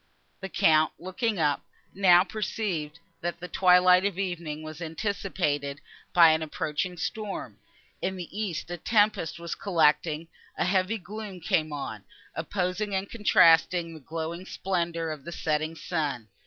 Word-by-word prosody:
The 190 - -6
count, 160 -5 +3
looking 205 +5 -2
up, 150 -3 +1 0.3
now 180 -2 +6
perceived, 185 -6 -3 0.2
that 175 0 -3
the 180 - -6
twilight 180 0 +5
of 200 -2 -1
evening 170 -5 -3
was 155 +1 -8
anticipated 160 -5 -2 0.3
by 170 -2 +7
an 160 0 +1
approaching 160 +3 -3
storm. 200 +4 -5 0.4
In 190 +1 -1
the 180 -2 -6
east 185 -6 -3
a 175 - -3
tempest 205 -3 +2
was 170 0 -5
collecting; 160 -3 +1 0.3
a - - +1
heavy 190 +4 +1
gloom 205 0 -8
came 155 -2 0
on, 125 -8 -5 0.3
opposing 190 +4 -2
and 190 +1 -3
contrasting 170 -5 +4
the 160 - -10
glowing 165 +5 -5
splendour 170 -3 -2
of 150 -3 -7
the 170 - -7
setting 155 0 -1
sun. 150 -10 -3
175 Hz, 140 wpm, -27 LUFS, 160-190 Hz, 0.4 s, by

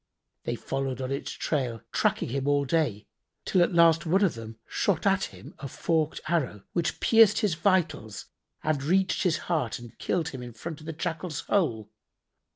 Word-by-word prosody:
They 120 - -1
followed 135 +1 -3
on 130 0 -3
his 140 - -3
trail 125 -7 -2
tracking - - +1
him 135 +2 -2
all 145 0 +3
day, 130 -8 0 0.4
till 185 - +3
at 175 - +3
last 165 -1 +6
one 185 +5 +3
of 190 - +3
them 115 -1 -9
shot 195 -3 0
at 195 -1 +3
him - - -12
a - - -7
forked[FN#80] 155 +3 0
arrow, 140 - -1
which 170 -2 -1
pierced 225 -2 +5
his 210 -6 +2
vitals 160 - 0 0.4
and 155 -3 0
reached 185 +6 +2
his 175 -3 +2
heart 155 -11 0
and 120 -2 -12
killed 165 -3 0
him 130 - -7
in 120 -1 -8
front 155 +7 -7
of 155 - -12
the 160 - -3
Jackal's 165 0 -3
hole. 115 - 0
155 Hz, 180 wpm, -27 LUFS, 130-175 Hz, 0.4 s, last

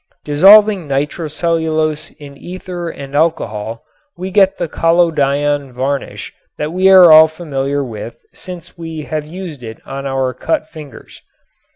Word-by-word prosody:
Dissolving 195 +4 +5
nitrocellulose 155 +2 -2
in 145 -2 -12
ether 175 +2 -7
and 140 -3 -9
alcohol 115 -8 -1 0.3
we 185 +2 -5
get 195 -1 +3
the 175 - -2
collodion 145 -4 +1
varnish 135 +3 -4 0.2
that 150 +2 -4
we 185 +1 +3
are 185 -3 +8
all 155 0 +9
familiar 145 -3 -3
with 115 -2 -8 0.2
since 180 -3 -10
we 165 -2 -7
have 155 0 -4
used 170 -4 -8
it 115 -2 -9
on 135 0 -6
our 135 -1 -1
cut 155 +4 -2
fingers. 155 -4 -13
155 Hz, 135 wpm, -16 LUFS, 140-170 Hz, 0.3 s, all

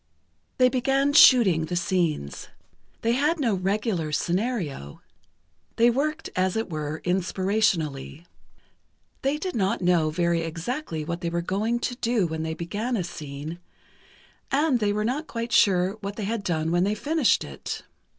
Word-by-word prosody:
They 255 - +6
began 270 +2 +1
"shooting" 210 - +7
the 175 - -4
scenes. 170 - -1 0.6
They 230 - +2
had 295 +7 +1
no 235 -7 +1
regular 190 -3 -1
scenario. 170 - -2 0.8
They 235 +1 +5
worked, 305 +5 -1
as 185 0 +1
it 225 -4 -2
were, 155 0 -4
inspirationally. 180 -5 0 1.0
They 275 +2 0
did 365 +4 -4
not 195 -3 +1
know 175 -3 +3
very 170 +1 +1
exactly 165 - -4
what 170 +2 -4
they 170 - -1
were 170 0 -2
going 220 +7 -1
to 245 - -2
do 230 -5 +1
when 160 -1 -3
they 160 0 -3
began 210 +9 -3
a 185 - -1
scene, 155 0 -7 0.9
and 280 -2 +2
they 210 -2 +1
were 210 +1 -1
not 285 +7 -2
quite 230 0 -4
sure 190 0 +3
what 200 +1 -5
they 210 - -4
had 220 0 -2
done 160 -4 -1
when 175 +1 +2
they 205 +2 +1
finished 295 +3 +2
it. - - -6
195 Hz, 155 wpm, -25 LUFS, 170-240 Hz, 1.0 s, shooting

